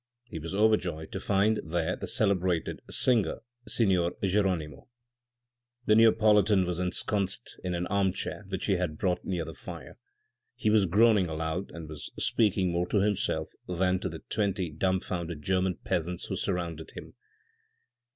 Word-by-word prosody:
He 110 -9 -7
was 85 +4 -5
overjoyed 95 -7 +1
to 95 - -4
find 100 +2 +2
there 85 +2 -1
the - - -6
celebrated 95 -7 0
singer, 120 -5 +1 0.3
signor 95 -6 +2
Geronimo. 95 -6 0 1.0
The 105 - +4
Neopolitan 105 -3 +5
was 90 -1 -2
ensconced 95 +4 -2
in 90 -1 -2
an 85 +1 -1
armchair 95 +1 -1
which 95 -2 -3
he - - 0
had 95 - +2
had 80 -4 -2
brought 90 0 0
near 90 -4 -2
the 80 - -7
fire. 65 - -10 0.6
He 110 - +1
was 105 -3 +4
groaning 105 +1 +4
aloud, 80 +4 -3
and 85 -2 -8
was 75 -2 -7
speaking 95 -5 +2
more 85 +1 0
to 105 - +1
himself 100 -6 0 0.2
than 90 +1 +1
to 95 - -3
the 80 -1 -9
twenty 95 -5 -1
dumbfounded 85 -2 -2
German 95 0 +1
peasants 85 +2 -2
who - - -3
surrounded 85 -4 -3
him. - - -9
95 Hz, 150 wpm, -29 LUFS, 85-100 Hz, 1.0 s, Neopolitan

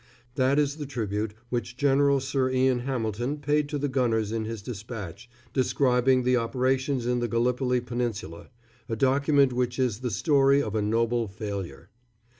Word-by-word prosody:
That 130 +2 +2
is 145 0 +1
the 145 -2 -5
tribute 105 -4 -3
which 120 0 -3
General 140 0 +3
Sir 135 0 0
Ian 130 -1 +2
Hamilton 120 +1 -2
paid 145 0 0
to 145 - -2
the 145 0 -1
gunners 115 -5 0
in 110 -1 -2
his 110 -2 -6
despatch 110 -2 -7 0.2
describing 130 -1 +2
the 125 0 +3
operations 130 +2 0
in 125 0 +1
the 120 - -1
Gallipoli 125 +2 +1
Peninsula 120 -8 -4 0.4
a 115 - -1
document 140 +2 +3
which 125 0 -1
is 125 -5 0
the 125 -1 -2
story 140 - +3
of 110 -7 -2
a 110 - 0
noble 115 +2 +1
failure. 100 -7 -6
125 Hz, 160 wpm, -26 LUFS, 115-135 Hz, 0.4 s, General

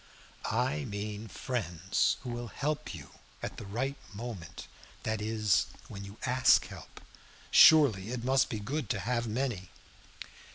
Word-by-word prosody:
"I 75 0 0
mean 105 +1 -5
friends 95 -5 -1
who 125 - -5
will 120 0 -4
help 145 +6 -3
you 70 -4 -11 0.3
at - - -5
the 100 - -8
right 130 +7 -2 0.2
moment, 110 -6 -7 0.4
that 110 -1 -1
is, 105 -3 +2 0.2
when 100 0 -7
you 100 +2 -11
ask 130 0 +5
help. - - -11 0.5
Surely 125 -11 +7
it 120 -1 -4
must 130 +1 +3
be 110 - -3
good 125 +3 -3
to 105 - 0
have 115 +4 -1
many." 115 -5 -2
110 Hz, 140 wpm, -31 LUFS, 100-125 Hz, 0.5 s, Surely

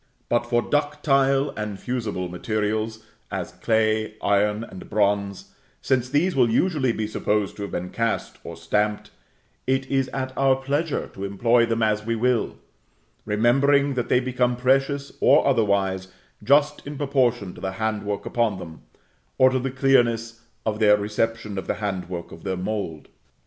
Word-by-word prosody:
But 120 0 +1
for 120 0 +1
ductile 145 -2 +1
and 105 -2 -5
fusible 110 -7 -3
materials, 110 +4 -2 0.2
as - - -4
clay, 110 -1 0
iron, 105 +2 +1
and 95 -5 -10
bronze, 100 -2 0 0.3
since 130 -1 0
these 155 +6 +1
will 125 -3 +4
usually 135 0 +2
be 110 -1 -2
supposed 105 -1 -1
to - - -7
have 100 - -5
been 90 +1 -4
cast 115 0 -2
or 85 - -7
stamped, 105 +5 -1 0.6
it 135 +1 +1
is 135 -1 +2
at 130 -1 -4
our 135 -1 +3
pleasure 140 +4 -1
to 95 - -7
employ 115 +4 +2
them 115 -1 0
as 105 -1 +1
we 115 +1 -1
will; 120 0 0 0.7
remembering 135 +6 +3
that 125 -2 -2
they 125 - +4
become 125 -1 0
precious, 135 +3 +1
or - - +5
otherwise, 100 -7 +1 0.4
just 145 +5 +3
in 145 0 -6
proportion 125 -9 0
to - - -13
the 95 0 -3
hand 110 +1 -2
work 100 0 -4
upon 115 -5 0
them, 80 -3 -10 0.6
or 130 0 +6
to 130 - +1
the 135 +1 -2
clearness 120 -4 +1 0.2
of 105 -1 -1
their 105 -1 +5
reception 105 0 -2
of - - -8
the - - 0
hand 95 -4 -4
work 85 -2 -6
of 80 - -12
their 95 -2 -2
mould. 90 -5 -4
115 Hz, 165 wpm, -24 LUFS, 105-130 Hz, 0.7 s, or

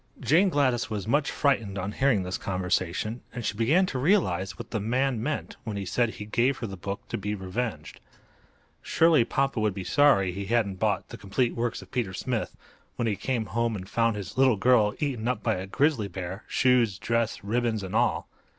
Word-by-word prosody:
Jane 180 +6 +4
Gladys 130 -7 +1
was 105 -2 -4
much 140 +4 +2
frightened 115 -9 0
on 95 +2 -3
hearing 125 -5 +2
this 90 +1 -4
conversation, 95 +4 -1
and 120 -2 -5
she - - -1
began 145 - +3
to 135 -8 -3
realize 125 - +1
what - - -9
the 110 - -1
man 125 +3 0
meant 150 +5 -3
when 110 -4 -4
he 100 - -4
said 120 +4 +1
he 105 - -7
gave 120 +5 +1
her 120 - -4
the 100 -3 -6
book 100 +2 -6
to - - -3
be 105 +1 -2
revenged. 95 -4 -4 0.8
Surely 160 -6 +4
papa 135 0 0
would 105 -3 0
be 95 - -4
sorry 125 -8 +4
he 100 +2 -5
hadn't 105 -4 +1
bought - - 0
the - - -9
"Complete 115 +5 0
Works 120 0 -2
of - - -19
Peter 115 -7 -2
Smith" 120 +2 -3 0.4
when 120 - -1
he 105 - +1
came 115 +3 -2
home 115 +3 -1
and 95 -2 -7
found 115 +1 +1
his 100 +4 -6
little 130 -5 +5
girl 110 -1 +4
eaten 125 -6 -2
up 125 -4 -1
by - - +2
a 95 +1 -5
grizzly 135 -1 +1
bear—shoes, 100 +4 0
dress, 115 0 -1
ribbons 110 0 0
and 95 +2 -5
all! 120 +1 +1
115 Hz, 200 wpm, -27 LUFS, 100-125 Hz, 0.8 s, little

